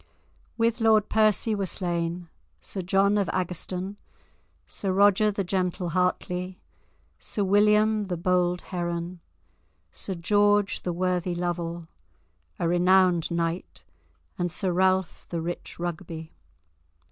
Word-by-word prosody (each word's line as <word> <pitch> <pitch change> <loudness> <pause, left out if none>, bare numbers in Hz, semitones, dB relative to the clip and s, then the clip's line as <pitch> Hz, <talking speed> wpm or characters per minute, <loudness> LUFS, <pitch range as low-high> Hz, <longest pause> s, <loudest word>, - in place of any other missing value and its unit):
With 230 0 +1
Lord 220 -2 +4
Percy 215 0 +3
were 200 -2 -1
slain, 175 -1 -2 0.3
Sir 190 - -6
John 195 +3 +2
of 200 - 0
Agerstone, 185 +2 -3 0.7
Sir 195 - -2
Roger 200 +2 +4
the 200 -1 -1
gentle 180 -1 -1
Hartly, 180 +1 -1 0.6
Sir 205 - -2
William 210 +2 +3
the 180 -2 -2
bold 180 0 +1
Heron, 175 -1 -4 0.7
Sir 190 - -5
George 205 +3 +2
the 180 - -2
worthy 180 0 -1
Lovel, 170 -1 -3 0.7
a 170 - 0
renowned 180 -1 +4
knight, 170 +1 -3 0.6
and 175 -1 0
Sir 185 +1 -1
Ralph 185 0 +1
the 170 - -2
rich 170 +2 -5
Rugby. 165 -2 -5
180 Hz, 115 wpm, -26 LUFS, 175-200 Hz, 0.7 s, Lord